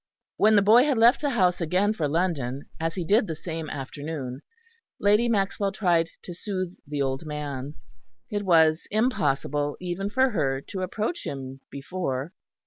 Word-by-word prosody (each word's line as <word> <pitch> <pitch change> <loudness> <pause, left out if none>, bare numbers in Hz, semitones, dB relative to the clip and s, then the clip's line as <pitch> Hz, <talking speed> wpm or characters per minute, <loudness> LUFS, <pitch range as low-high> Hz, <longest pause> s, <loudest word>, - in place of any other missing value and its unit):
When 215 +1 +5
the 200 - +5
boy 230 +6 +7
had 285 -5 +1
left 235 +4 +5
the 290 - +1
house 185 -8 +2
again 185 +6 +2
for 160 -8 -1
London, 145 -5 -1
as 165 0 -2
he 180 - -3
did 210 +4 +3
the 160 - -3
same 160 -1 -5
afternoon, 140 -1 -5 0.6
Lady 210 +4 +3
Maxwell 200 -2 0
tried 170 -5 +2
to 175 - -7
soothe 185 -1 -4
the 145 -1 -1
old 135 +1 -2
man. 145 -1 -5 0.6
It 205 -1 -1
was 160 -3 +4
impossible, 145 - 0
even 185 +2 -3
for 260 +4 +2
her, 135 -9 0
to 190 +7 -6
approach 215 - -2
him 135 -1 -6
before. 140 0 -4
175 Hz, 160 wpm, -26 LUFS, 145-205 Hz, 0.6 s, boy